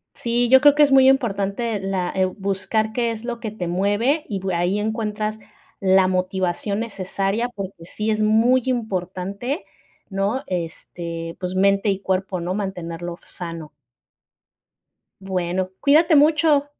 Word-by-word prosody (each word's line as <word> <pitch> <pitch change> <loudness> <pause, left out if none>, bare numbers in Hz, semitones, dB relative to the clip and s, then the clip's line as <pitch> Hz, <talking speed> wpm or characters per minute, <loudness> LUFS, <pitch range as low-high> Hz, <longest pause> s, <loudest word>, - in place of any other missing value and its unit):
Sí, 240 +1 0
yo 265 0 +7
creo 290 -1 +7
que 295 - +6
es 280 - +3
muy 265 0 +7
importante 225 -3 0
la 190 -2 -1
eh, 190 - +2
buscar 200 +3 -2
qué 235 -2 0
es 225 +1 -7
lo 240 -1 -4
que 220 - -4
te 190 -5 -5
mueve, 205 - +1
y 200 -3 -2
p 190 0 -2
ahí 175 +4 +1
encuentras 215 0 -2 0.4
la 190 -1 +4
motivación 185 +2 -1
necesaria, 200 +1 -2
porque 195 -6 -8
sí 210 +5 -4
es 215 0 0
muy 230 +4 +4
importante, 200 - -3 0.4
¿no? 200 +7 -1
Este, 165 -1 -5
pues, 180 0 -4
mente 195 +2 +3
y 195 -1 0
cuerpo, 190 -1 -1
¿no? 175 +2 -2
Mantenerlo 175 -4 -4
sano. 165 -3 -8 1.5
Bueno, 185 -1 -2
cuídate 310 +3 +5
mucho. 300 -1 +4
200 Hz, 145 wpm, -22 LUFS, 185-235 Hz, 1.5 s, yo